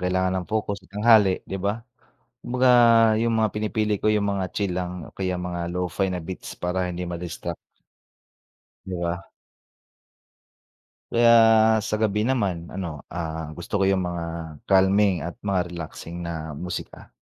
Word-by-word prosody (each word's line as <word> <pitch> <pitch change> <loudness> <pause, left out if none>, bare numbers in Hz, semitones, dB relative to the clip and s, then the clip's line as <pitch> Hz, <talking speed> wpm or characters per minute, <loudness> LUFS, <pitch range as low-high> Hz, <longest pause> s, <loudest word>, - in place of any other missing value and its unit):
kailangan 95 0 +1
ng 90 - -10
focus 105 -2 -2
sa 95 - -22
tanghali, 105 -1 +4
'di 95 - -5
ba? 105 +4 -2 0.6
Kumbaga, 125 +1 +1 0.5
yung 115 -1 +1
mga 110 -2 +1
pinipili 105 -1 -1
ko 110 - +3
yung 105 -1 +1
mga 95 -2 -2
chill 100 -4 -2
lang 90 -2 -4
o - - -16
kaya 95 -2 -2
mga 85 -1 -4
Lo-fi 90 +2 -1
na 90 - -2
beats 90 +2 -8
para 90 +1 -1
hindi 90 0 -4
ma-distract. 85 -1 -5 1.3
'Di 95 - -4
ba? 85 +2 -2 1.9
Kaya 120 0 +5 0.6
sa 105 - 0
gabi 105 -1 +1
naman 105 -9 +1 0.2
ano, 85 -6 -5
ah, 80 -2 -4
gusto 85 +4 -4
ko - - +3
yung 95 -1 +2
mga 85 -1 -4 0.4
calming 95 -1 +3
at 85 +1 -5
mga 95 -3 +2
relaxing 85 0 -7
na 80 -3 -5
musika. 90 +1 -7
95 Hz, 150 wpm, -24 LUFS, 85-105 Hz, 1.9 s, Kaya